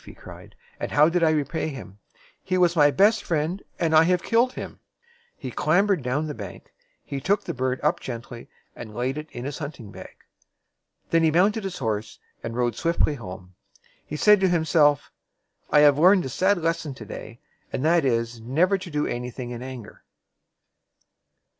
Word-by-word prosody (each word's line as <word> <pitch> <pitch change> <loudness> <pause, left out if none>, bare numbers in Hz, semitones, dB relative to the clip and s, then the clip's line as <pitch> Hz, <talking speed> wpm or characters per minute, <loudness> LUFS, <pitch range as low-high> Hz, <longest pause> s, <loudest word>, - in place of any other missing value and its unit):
he - - -13
cried; - - -13 0.2
"and - - -4
how 150 +1 +6
did 175 +1 0
I 165 - +4
repay 155 +1 -1
him? 130 -9 -9 0.4
He 185 -1 -1
was 175 -1 +3
my 145 -3 +6
best 205 +8 +3
friend, 165 +4 -1 0.2
and 165 -2 0
I 155 - +8
have 180 +1 +1
killed 240 +3 +2
him." - - -8 0.6
He 130 -5 -7
clam 175 - +2
bered 195 -6 +1
down 130 +5 -1
the 150 - -4
bank. 100 -7 -10 0.3
He 140 -1 -5
took 200 +7 +1
the - - -4
bird 130 0 -2
up 155 +4 +1
gently, 120 -1 -8 0.3
and 110 -3 -10
laid 130 +5 -2
it 155 0 -9
in 120 +1 -7
his 140 0 -5
hunting 140 -9 -7
bag. - - -11 1.0
Then 165 - +4
he 160 - +4
mounted 195 +7 +2
his 190 -2 -5
horse 110 -3 -3 0.2
and 115 - -6
rode 120 -2 0
swiftly 165 +1 +1
home. 95 -7 -9 0.5
He 150 - -7
said 210 +6 +5
to 190 -1 +2
himself, 155 -4 +2 0.6
"I 150 - +5
have 145 -1 +5
learned 185 +2 +5
a - - -4
sad 190 +9 +2
lesson 165 -4 -2
to 110 - -10
day; 115 +3 -9 0.3
and 130 - -2
that 170 0 +4
is, 115 -2 -1
never 170 - +1
to 185 -1 -8
do 150 -2 -1
any 120 +1 -4
thing 125 0 -7
in 120 0 -6
anger." 130 -4 -9
150 Hz, 190 wpm, -24 LUFS, 125-175 Hz, 1.0 s, I